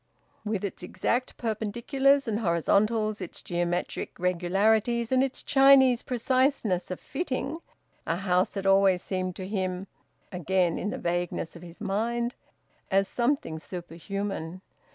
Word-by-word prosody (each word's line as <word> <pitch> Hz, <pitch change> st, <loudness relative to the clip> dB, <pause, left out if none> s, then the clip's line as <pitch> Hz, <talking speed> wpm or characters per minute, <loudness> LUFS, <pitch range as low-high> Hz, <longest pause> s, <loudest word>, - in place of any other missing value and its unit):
With 210 Hz, -2 st, -2 dB
its 195 Hz, -, -5 dB
exact 240 Hz, +7 st, -2 dB
perpendiculars 240 Hz, +5 st, +1 dB
and 215 Hz, -1 st, 0 dB
horizontals, 215 Hz, +4 st, +1 dB
its 185 Hz, -, -7 dB
geometric 175 Hz, 0 st, -2 dB
regularities, 205 Hz, +7 st, +1 dB
and 260 Hz, 0 st, +4 dB
its 270 Hz, -1 st, -3 dB
Chinese 270 Hz, -3 st, +6 dB
preciseness 250 Hz, -6 st, +1 dB
of 185 Hz, -, -4 dB
fitting, 275 Hz, -1 st, -3 dB, 0.5 s
a 165 Hz, -, +1 dB
house 180 Hz, +1 st, +1 dB
had 195 Hz, -1 st, -3 dB
always 195 Hz, -2 st, +4 dB
seemed 185 Hz, -2 st, -3 dB
to 185 Hz, -, -6 dB
him 185 Hz, -2 st, -2 dB, 0.5 s
again 180 Hz, -1 st, +1 dB
in 205 Hz, -, -2 dB
the -, -, -4 dB
vagueness 175 Hz, -1 st, -2 dB
of 170 Hz, -, -10 dB
his 170 Hz, -1 st, -12 dB
mind 235 Hz, +4 st, -1 dB, 0.6 s
as 195 Hz, 0 st, +3 dB
something 235 Hz, -, -1 dB
superhuman. 180 Hz, +1 st, -5 dB
200 Hz, 130 wpm, -27 LUFS, 180-235 Hz, 0.6 s, Chinese